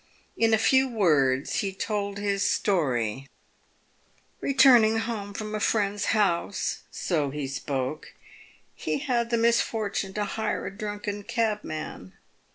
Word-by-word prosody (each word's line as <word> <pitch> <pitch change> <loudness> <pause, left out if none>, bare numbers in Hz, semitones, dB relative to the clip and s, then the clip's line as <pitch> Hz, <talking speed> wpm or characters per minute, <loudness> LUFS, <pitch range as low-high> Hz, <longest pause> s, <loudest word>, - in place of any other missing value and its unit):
In 225 0 +2
a 220 - +5
few 265 +4 +4
words 150 - +2
he 195 - -1
told 200 +1 -3
his 200 -1 -1
story: 135 - 0 0.6
" - - -38
Returning 245 -5 +5
home 225 -3 -3
from 215 +1 -6
a 215 - -1
friend's 205 -1 0
house," 200 -3 0
so 155 -6 -1
he 140 0 -4
spoke, 135 +1 -4 0.3
" - - -30
he - - -2
had 245 -5 -1
the 235 - +1
misfortune 220 -4 0
to 210 -1 0
hire 220 0 -2
a 195 - -6
drunken 205 0 -4
cabman. 210 - -3
205 Hz, 135 wpm, -26 LUFS, 165-225 Hz, 0.6 s, a